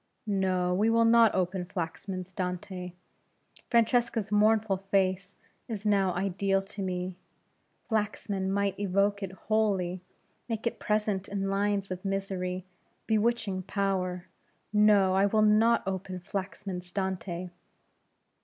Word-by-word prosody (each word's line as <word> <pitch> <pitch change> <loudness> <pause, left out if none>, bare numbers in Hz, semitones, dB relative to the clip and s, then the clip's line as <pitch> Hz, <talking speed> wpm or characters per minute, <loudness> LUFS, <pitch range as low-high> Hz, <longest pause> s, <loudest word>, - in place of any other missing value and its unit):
No, 185 -3 +1
we 210 +5 +2
will 230 0 +4
not 230 -1 +6
open 185 0 0
Flaxman's 185 +1 -5
Dante. 180 0 -4 0.8
Francesca's 235 -2 +2
mournful 210 -1 +3
face 195 0 0 0.3
is 215 -3 -5
now 200 -3 +3
ideal 195 +1 0
to 200 +1 -8
me. 180 -1 -3 0.7
Flaxman 210 -3 -1
might 200 0 0
evoke 200 +1 +1
it 195 -2 -4
wholly, 190 -3 0 0.5
make 225 -1 -3
it 235 - -1
present 210 -3 0
in 195 -1 -2
lines 200 -1 0
of 185 0 -5
misery 190 -2 -2 0.4
bewitching 220 -3 +1
power. 185 -2 -1 0.5
No! 210 -3 +5
I 195 +1 +4
will 215 +1 +3
not 220 +2 +4
open 190 -1 -3
Flaxman's 185 -1 -5
Dante! 185 -2 -3
195 Hz, 115 wpm, -29 LUFS, 185-210 Hz, 0.8 s, not